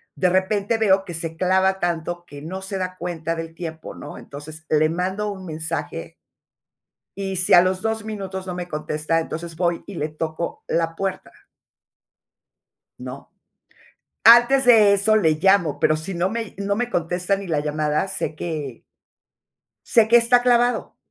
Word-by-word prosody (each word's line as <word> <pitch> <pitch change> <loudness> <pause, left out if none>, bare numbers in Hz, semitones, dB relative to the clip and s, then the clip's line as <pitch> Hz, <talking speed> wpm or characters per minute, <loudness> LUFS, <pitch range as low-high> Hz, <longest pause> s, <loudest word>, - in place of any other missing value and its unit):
De 180 - +2
repente 200 +4 +1
veo, 195 -3 +3
que 175 - -7
se 165 0 -3
clava 190 +1 +2
tanto, 175 0 -2
que 145 -4 -11
no 185 +5 -6
se 195 0 -4
da 185 0 -4
cuenta 170 -1 -3
del 165 0 -6
tiempo, 165 -2 -7
¿no? - - -9
Entonces, 155 +3 -10
le 155 0 +3
mando 190 +5 -2
un 190 -2 -9
mensaje. 160 0 -4 1.0
Y 195 -1 -3
si 180 0 +2
a 175 - +9
los 185 +1 0
2 220 -1 -1
minutos 190 -3 -6
no 180 - -4
me 180 -1 -5
contesta, 155 0 -1
entonces 165 +1 -6
voy, 170 0 -1
y 200 - -9
le 155 -1 -2
toco 160 +2 -5
la 165 0 -1
puerta. 195 +2 -4 1.7
No, - - -9 0.9
antes 240 +3 +7
de 220 -4 +7
eso 200 +2 +3
le 175 -7 +4
llamo, 175 -1 +2
pero 155 - +3
si 170 +5 -5
no 175 +2 0
me 225 -1 -5
no 200 0 -1
me 245 +3 -1
contesta 175 +1 0
ni 195 0 -7
la 160 -3 0
llamada, 150 +3 -1
sé 160 - -3
que 150 -7 -5 1.0
sé 225 -2 +4
que 235 - +4
está 240 +1 +4
clavado, 245 0 +1
180 Hz, 165 wpm, -22 LUFS, 160-200 Hz, 1.7 s, a